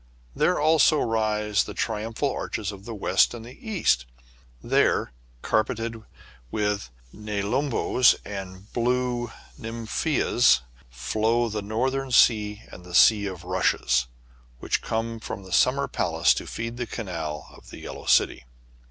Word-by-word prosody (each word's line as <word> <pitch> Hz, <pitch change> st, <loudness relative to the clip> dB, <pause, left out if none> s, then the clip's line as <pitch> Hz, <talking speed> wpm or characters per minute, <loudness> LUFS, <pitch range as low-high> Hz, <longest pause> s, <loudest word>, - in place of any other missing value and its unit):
There 180 Hz, -, +2 dB
also 155 Hz, 0 st, +4 dB
rise 105 Hz, -2 st, 0 dB
the -, -, -8 dB
tri 110 Hz, -2 st, -2 dB
umphal 115 Hz, +5 st, -2 dB
arches 105 Hz, -2 st, -3 dB
of 100 Hz, 0 st, -12 dB
the 115 Hz, -, -6 dB
West 105 Hz, -, +2 dB
and 115 Hz, -1 st, -9 dB
East; 125 Hz, -, -1 dB, 0.6 s
there, -, -, +2 dB, 0.3 s
car 110 Hz, -, +3 dB
peted 115 Hz, +1 st, -5 dB, 0.5 s
with 105 Hz, -, -1 dB, 0.2 s
nelumbos 110 Hz, +5 st, +1 dB
and 95 Hz, -1 st, -8 dB
blue 120 Hz, -1 st, 0 dB, 0.3 s
nymphœas, 115 Hz, -, +1 dB, 0.3 s
flow 110 Hz, -, 0 dB
the 105 Hz, 0 st, -3 dB
Northern 130 Hz, +6 st, -1 dB
Sea 105 Hz, -4 st, +3 dB
and 90 Hz, -, -11 dB
the 90 Hz, 0 st, -7 dB
Sea 105 Hz, +1 st, +6 dB
of 90 Hz, -3 st, -7 dB
Rushes, 65 Hz, -9 st, +1 dB, 0.5 s
which -, -, -1 dB
come 115 Hz, +1 st, -3 dB
from 100 Hz, -, -7 dB
the 95 Hz, -1 st, -8 dB
Summer -, -, +3 dB
Palace -, -, +2 dB
to -, -, -5 dB
feed 115 Hz, +1 st, -5 dB
the 120 Hz, -1 st, -3 dB
canal 85 Hz, -10 st, -5 dB
of -, -, -16 dB
the -, -, -10 dB
Yellow -, -, -8 dB
City. -, -, +3 dB
110 Hz, 135 wpm, -25 LUFS, 100-120 Hz, 0.6 s, Sea